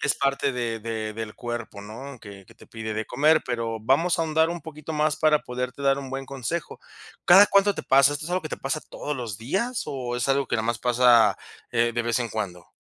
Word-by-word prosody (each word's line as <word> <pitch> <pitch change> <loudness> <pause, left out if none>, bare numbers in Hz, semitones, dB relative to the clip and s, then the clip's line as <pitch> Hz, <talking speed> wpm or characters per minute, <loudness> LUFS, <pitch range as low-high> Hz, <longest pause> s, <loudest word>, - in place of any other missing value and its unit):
es - - +1
parte 140 0 0
de 120 -2 -2
de 110 -1 -4
del 110 0 -6
cuerpo, 120 -4 -6
¿no?, 125 +5 -9
que 100 -2 -12
que - - -18
te - - -18
pide 110 -1 -5
de 110 +1 -2
comer, 155 +5 +3
pero 115 -2 -3
vamos 140 +10 +2
a - - +3
ahondar 160 0 +2
un 170 0 -4
poquito 155 0 -8
más 150 0 +1
para 155 -1 +3
poderte 125 +2 -5
dar 135 0 +3
un 135 -2 -7
buen 135 0 -4
consejo. 140 +5 -5 0.5
¿Cada 195 +3 +8
cuánto 200 0 +3
te - - -5
pasa? 135 +1 +5
¿Esto 145 +1 -5
es - - -7
algo 180 0 0
que 155 - -5
te - - -4
pasa 145 +3 -3
todos 150 -1 -6
los 115 -6 -5
días 195 - -2
o 125 -3 -4
es 125 +2 -1
algo 135 0 +2
que - - -2
nada 110 0 -1
más 120 -1 -1
pasa, 120 -4 +4 0.4
eh, 120 0 +2
de 120 - -1
vez 120 +1 0
en 120 - -2
cuando? 95 -5 -5
125 Hz, 240 wpm, -25 LUFS, 115-150 Hz, 0.5 s, Cada